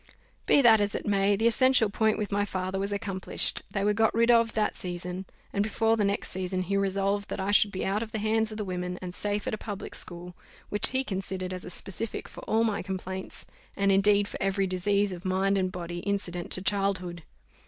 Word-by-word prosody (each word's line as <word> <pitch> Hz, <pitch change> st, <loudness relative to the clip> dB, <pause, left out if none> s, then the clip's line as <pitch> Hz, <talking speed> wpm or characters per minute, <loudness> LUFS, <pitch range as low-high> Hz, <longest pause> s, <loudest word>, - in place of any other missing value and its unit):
Be 280 Hz, -, +6 dB
that 225 Hz, -3 st, +7 dB
as 205 Hz, 0 st, 0 dB
it -, -, -4 dB
may, 200 Hz, 0 st, +3 dB
the 220 Hz, +3 st, -1 dB
essential 255 Hz, 0 st, +4 dB
point 220 Hz, +1 st, +2 dB
with 210 Hz, -1 st, -3 dB
my 205 Hz, 0 st, +1 dB
father 190 Hz, -1 st, -3 dB
was 200 Hz, +1 st, -1 dB
accomplished: 195 Hz, -2 st, -1 dB
they 195 Hz, -, -2 dB
were 210 Hz, +1 st, +3 dB
got 220 Hz, +1 st, +3 dB
rid 230 Hz, +1 st, +4 dB
of 230 Hz, -1 st, +4 dB
that 215 Hz, -1 st, +1 dB
season, 180 Hz, +1 st, -5 dB, 0.3 s
and 200 Hz, -, +1 dB
before 225 Hz, +2 st, +2 dB
the 215 Hz, -, +1 dB
next 200 Hz, +1 st, 0 dB
season 185 Hz, 0 st, -2 dB
he 200 Hz, +2 st, -2 dB
resolved 195 Hz, +1 st, 0 dB
that -, -, -4 dB
I 190 Hz, +2 st, 0 dB
should 205 Hz, 0 st, +5 dB
be 190 Hz, -, -3 dB
out 200 Hz, +3 st, 0 dB
of 225 Hz, -1 st, -5 dB
the 220 Hz, -, -3 dB
hands 220 Hz, +1 st, +1 dB
of 215 Hz, -, -6 dB
the 210 Hz, -, -3 dB
women, 180 Hz, -1 st, -3 dB
and 180 Hz, -1 st, -6 dB
safe 205 Hz, +2 st, -2 dB
at -, -, -2 dB
a 215 Hz, -, -3 dB
public 205 Hz, -3 st, -6 dB
school, 175 Hz, 0 st, -2 dB, 0.3 s
which 205 Hz, -, +2 dB
he 260 Hz, 0 st, 0 dB
considered 190 Hz, -4 st, -3 dB
as 185 Hz, -, -6 dB
a -, -, -6 dB
specific 195 Hz, +5 st, -3 dB
for -, -, -11 dB
all 225 Hz, +1 st, +2 dB
my 215 Hz, -3 st, 0 dB
complaints, 190 Hz, 0 st, -5 dB, 0.3 s
and 200 Hz, 0 st, +3 dB
indeed 200 Hz, +1 st, +4 dB
for -, -, -7 dB
every 195 Hz, 0 st, +1 dB
disease 200 Hz, +2 st, +1 dB
of 175 Hz, -1 st, -7 dB
mind 190 Hz, +1 st, +1 dB
and 185 Hz, -1 st, 0 dB
body 175 Hz, -1 st, -5 dB
incident 180 Hz, -2 st, -3 dB
to 185 Hz, -, -2 dB
childhood. 190 Hz, -3 st, -1 dB
200 Hz, 225 wpm, -28 LUFS, 185-210 Hz, 0.3 s, that